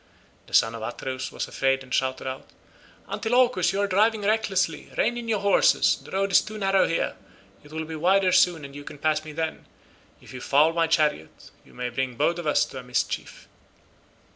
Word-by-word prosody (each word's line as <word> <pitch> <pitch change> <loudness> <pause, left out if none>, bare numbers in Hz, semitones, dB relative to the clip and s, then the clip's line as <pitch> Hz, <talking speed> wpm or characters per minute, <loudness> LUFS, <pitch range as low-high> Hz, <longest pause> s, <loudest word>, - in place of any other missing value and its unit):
The - - -3
son 115 0 +4
of 115 - -7
Atreus 130 +3 -5
was - - -4
afraid 135 0 0
and 130 0 -10
shouted 130 0 -1
out, 130 0 -6 0.6
"Antilochus, 245 +2 +2
you 195 - -2
are 200 - +1
driving 210 +3 +2
recklessly; 195 -6 0
rein 240 - +1
in 240 -1 -6
your 215 -3 0
horses; 200 -1 +3
the - - -13
road 195 +1 -1
is - - +6
too 215 0 -8
narrow 195 -1 +2
here, 165 - -1 0.5
it 145 - -16
will 160 0 -4
be 160 0 -7
wider 185 +4 +3
soon, 170 -5 +3
and 140 0 -11
you 145 - -8
can 145 - -10
pass 155 +1 0
me 155 - -9
then; 160 +1 -4 0.5
if - - -15
you 125 - -8
foul 150 +5 +3
my 165 -1 +1
chariot 155 - -1
you - - -20
may 125 0 -3
bring 125 0 -3
both 170 +8 +1
of 170 - -5
us 150 - +3
to 130 - -9
a - - -9
mischief." 125 0 -3
160 Hz, 205 wpm, -25 LUFS, 135-195 Hz, 0.6 s, is